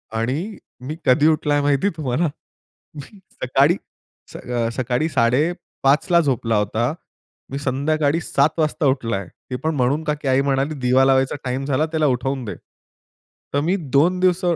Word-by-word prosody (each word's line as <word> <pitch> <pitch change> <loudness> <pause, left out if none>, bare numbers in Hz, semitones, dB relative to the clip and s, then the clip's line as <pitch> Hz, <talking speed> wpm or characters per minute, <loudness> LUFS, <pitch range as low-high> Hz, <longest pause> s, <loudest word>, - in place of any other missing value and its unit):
आणि 145 - -2 0.3
मी 155 - -4
कधी 130 +4 +4
उठलाय 150 -2 +2
माहिती 145 +6 +2
तुम्हाला? 150 +3 0 0.7
मी 150 +8 -11 0.2
सकाळी 135 +6 +3 0.6
अ, 120 -2 -2
सकाळी 130 +5 -1
5:30 140 +2 +1
ला 170 - +6
झोपला 120 -6 0
होता, 110 +5 0 0.6
मी 135 - -3
संध्याकाळी 145 +3 0
7:00 145 -2 +2
वाजता 155 -1 0
उठलाय. 115 -8 -1 0.2
ते - - -1
पण 160 0 0
म्हणून 140 +4 +1
का 150 -1 0
की - - -4
आई 130 +1 +3
म्हणाली," 140 +2 0
दिवा 130 +1 +3
लावायचा 135 0 +2
टाईम 130 +1 -2
झाला 145 +2 +1
त्याला 155 -2 +1
उठवून 135 +1 -1
दे." 105 - -5 1.0
तर 140 - +2
मी 170 +6 +1 0.2
2 175 +6 +4
दिवस 185 0 +2
140 Hz, 150 wpm, -21 LUFS, 130-155 Hz, 1.0 s, ला